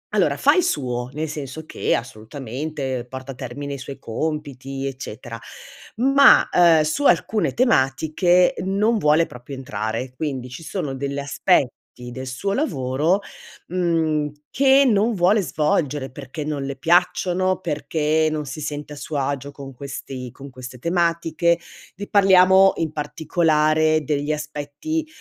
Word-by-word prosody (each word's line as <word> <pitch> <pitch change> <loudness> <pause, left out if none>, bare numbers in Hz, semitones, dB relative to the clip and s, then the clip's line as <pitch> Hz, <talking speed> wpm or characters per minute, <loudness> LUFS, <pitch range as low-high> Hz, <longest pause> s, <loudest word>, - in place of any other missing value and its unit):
allora - - +2
fa - - +4
il 365 - +3
suo, 125 - -2
nel 155 +2 -3
senso 150 0 -6
che - - -1
assolutamente 130 +3 -5
porta 130 +1 -7
a - - -9
termine 135 +2 -6
i - - -5
suoi 135 +1 -8
compiti 135 0 -4
eccetera; 120 -3 -7 0.6
ma, 275 +3 +6
ehm, 170 -3 +5
su 155 - -1
alcune 205 +2 +2
tematiche 175 - +3
non 205 +4 +1
vuole 155 0 +4
proprio 125 +1 -10
entrare. 125 -1 -4
Quindi, 130 -4 -4
ci 130 +6 -9
sono 155 -5 -4
degli 140 +1 -4
aspetti 140 0 +2 0.4
del 130 +2 -6
suo 195 +10 -2
lavoro, 155 - 0 0.5
mhmm, 160 -4 0 0.2
che 275 +1 +5
non 225 -1 +3
vuole 195 +2 +3
svolgere, 150 -4 -1
perché 140 +3 -7
non 145 -2 -3
le 135 0 -4
piacciono, 180 +4 +2
perché 155 -1 0
non 155 -1 -3
si 155 +4 -6
sente 150 0 -5
a - - -8
suo 145 +1 -5
agio 140 0 -2
con 140 -1 -10
questi 130 -2 -7
con 140 +3 -11
queste 130 -1 -10
tematiche 170 +1 +1 0.4
di 205 +1 -8
parliamo 190 -1 +6
in 160 -2 -1
particolare 155 0 +1
degli 145 +1 -1
aspetti, 150 - -4
150 Hz, 140 wpm, -22 LUFS, 135-175 Hz, 0.6 s, ma